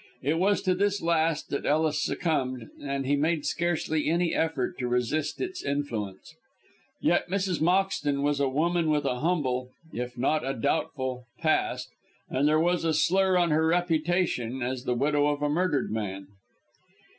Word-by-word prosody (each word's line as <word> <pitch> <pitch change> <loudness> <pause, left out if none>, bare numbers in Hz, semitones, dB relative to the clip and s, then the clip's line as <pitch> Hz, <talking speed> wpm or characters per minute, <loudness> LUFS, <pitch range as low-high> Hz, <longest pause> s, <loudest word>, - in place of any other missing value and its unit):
It 155 +5 +1
was 200 +2 +2
to 185 - +2
this 200 +2 +1
last 165 -2 0
that 140 - -2
Ellis 155 0 +2
succumbed, 130 -8 -1
and 140 -1 -3
he 140 +2 +2
made 155 +1 0
scarcely 160 -3 0
any 170 +1 +1
effort 160 -6 -1
to 125 - -1
resist 125 +5 -1
its 375 0 -4
influence. 120 -7 -3 0.7
Yet - - +1
Mrs. 190 -3 -1
Moxton 170 -5 +1
was 145 0 +1
a 140 -1 +2
woman 165 +4 +1
with 150 -2 +1
a 125 -2 -1
humble 130 -6 0 0.2
if 125 +1 -5
not 150 +5 +1
a 135 +1 -2
doubtful 130 -2 -2
past, 155 -1 0 0.4
and 135 +3 +2
there 155 +1 +4
was 175 +1 +1
a 160 -1 +1
slur 190 +3 +3
on 175 -2 +2
her 160 +1 +3
reputation 165 -7 0
as 125 +1 -3
the 125 - 0
widow 145 +3 +2
of 145 0 -1
a 145 - +2
murdered 160 -4 0
man. 100 -3 -3
150 Hz, 165 wpm, -27 LUFS, 130-170 Hz, 0.7 s, there